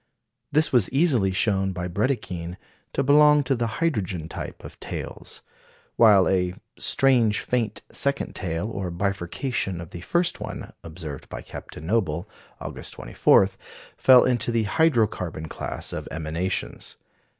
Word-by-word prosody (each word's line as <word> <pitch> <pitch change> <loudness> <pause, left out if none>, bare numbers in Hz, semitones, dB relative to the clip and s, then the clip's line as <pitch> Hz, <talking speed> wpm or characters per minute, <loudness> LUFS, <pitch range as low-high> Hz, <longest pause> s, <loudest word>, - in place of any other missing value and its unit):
This 155 0 +3
was 120 -7 +4
easily 130 - +3
shown 95 0 +1
by 90 0 -3
Brédikhine 90 -4 -2 0.4
to 140 - +1
belong 150 +1 +6
to 135 +1 +1
the 120 -1 -1
hydrogen 100 - -1
type - - -7
of - - -11
tails; - - -6 0.5
while 105 -5 +6
a 90 -1 +1 0.2
"strange, 125 -6 +3
faint 115 -4 -1
second 140 0 -1
tail, 85 +2 -3
or 100 -5 -4
bifurcation 95 +2 -2
of 85 -2 -9
the 85 - -8
first 175 - 0
one," - - -7
observed 80 -4 -8
by - - -7
Captain 80 - -9
Noble, 90 -3 0 0.3
August - - -6
24, - - +3 0.5
fell 130 -1 +7
into 120 -2 +1
the 115 -1 +1
hydro 125 0 +3
carbon 80 -6 -5
class - - -5
of - - -5
emanations. 80 +4 -4
100 Hz, 140 wpm, -25 LUFS, 90-130 Hz, 0.5 s, fell